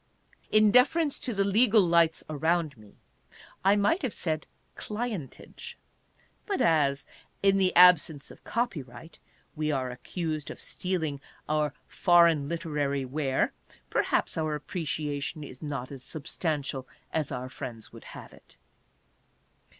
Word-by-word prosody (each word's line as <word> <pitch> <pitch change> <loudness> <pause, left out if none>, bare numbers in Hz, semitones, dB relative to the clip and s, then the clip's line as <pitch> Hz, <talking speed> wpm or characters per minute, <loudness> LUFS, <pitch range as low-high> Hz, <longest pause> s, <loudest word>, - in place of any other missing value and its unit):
In 215 -1 +5
deference 285 +5 +4
to 255 - -3
the 200 -3 +1
legal 210 +1 +4
lights 170 -2 +3
around 160 0 0
me, 105 -3 -18 0.7
I 195 +2 +5
might 210 - +2
have 260 -7 -2
said 155 -2 -2
" - - -41
clientage," 210 - -6 0.7
but 400 -3 -1
as, 145 -4 +2 0.4
in 195 0 +5
the 185 -1 +3
absence 170 -5 +6
of - - -16
copyright, 160 - -4 0.4
we 155 0 -1
are 130 -3 -1
accused 155 +4 -4
of - - -8
stealing 160 -7 -3 0.3
our 150 -1 0
foreign 170 -6 +4
literary 150 -5 -1
ware, 135 0 0 0.4
perhaps - - +1
our 155 -1 0
appreciation 150 -1 -3
is 130 -3 -10
not 145 -4 -4
as 135 -2 -9
substantial 145 -3 -3 0.3
as 155 -3 -1
our 125 +1 -4
friends 115 -3 -8
would - - -12
have - - -11
it. - - -19
155 Hz, 130 wpm, -28 LUFS, 140-185 Hz, 0.7 s, absence